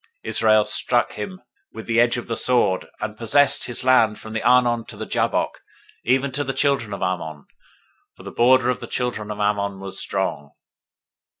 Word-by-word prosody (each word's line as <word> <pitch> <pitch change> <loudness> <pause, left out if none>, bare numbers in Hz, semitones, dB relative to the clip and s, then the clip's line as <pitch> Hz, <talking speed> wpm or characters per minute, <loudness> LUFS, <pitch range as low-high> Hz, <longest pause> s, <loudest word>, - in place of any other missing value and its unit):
021:024 - - -4
Israel 110 -1 +3
struck 120 +3 +1
him 185 -1 -7 0.3
with - - -9
the 115 0 +1
edge 120 0 +2
of 120 - -5
the 115 - -3
sword, 120 -7 +1
and 105 - -4
possessed 125 +6 +2
his 120 +1 -1
land 115 -4 +3
from 110 - -10
the 115 - -2
Arnon 120 -1 +3
to - - -10
the - - -5
Jabbok, - - -1 0.4
even 135 +3 +1
to 145 +3 -2
the 135 -1 -3
children 135 -7 0
of 100 - -4
Ammon; 80 -5 -4 0.7
for - - -15
the - - -8
border 125 +1 +3
of 125 - -4
the - - -8
children 120 -4 -3
of 105 - -5
Ammon 100 -1 -1
was 95 0 -6
strong. 75 -7 -3
115 Hz, 190 wpm, -22 LUFS, 105-125 Hz, 0.7 s, Israel